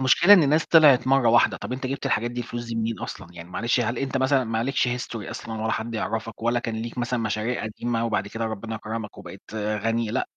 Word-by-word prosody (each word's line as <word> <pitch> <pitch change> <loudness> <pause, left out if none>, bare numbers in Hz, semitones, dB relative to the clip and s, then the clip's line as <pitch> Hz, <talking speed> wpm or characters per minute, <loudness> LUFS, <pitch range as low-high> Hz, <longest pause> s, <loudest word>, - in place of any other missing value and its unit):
المشكلة 160 +9 +6
إن 155 -7 +4
ناس 155 +2 +2
طلعت 150 -6 +6
مرّة 135 -3 +4
واحدة، 120 +1 +4
طب - - -6
أنت 130 +1 -3
جبت 135 +2 -3
للحاجات 120 +2 0
دي 120 0 -4
الفلوس 120 0 -5
دي 115 - -5
منين 115 0 -2
أصلًا؟ 90 - -7
يعني 85 0 -10
معلش 120 +6 0
هل 120 +1 -1
أنت 135 0 -2
مثلًا 130 0 +2
ما 115 -1 -2
عليكش 130 +1 +1
history 120 -3 -4
أصلًا، 110 -1 -6
ولا 110 - 0
حد 115 +1 -3
يعرفك، 110 0 -4
ولا 120 +1 +2
كان 115 -1 -4
ليك 115 +2 -6
مثلًا 120 0 -1
مشاريع 110 +2 -2
قديمة 115 +2 -2
وبعد 105 -3 -1
كده 115 +1 -4
ربنا 110 0 -4
كرمك 110 -1 -6
وبقيت 95 0 -11
غني 110 +2 -1
لأ، - - -1
115 Hz, 230 wpm, -24 LUFS, 110-125 Hz, -, المشكلة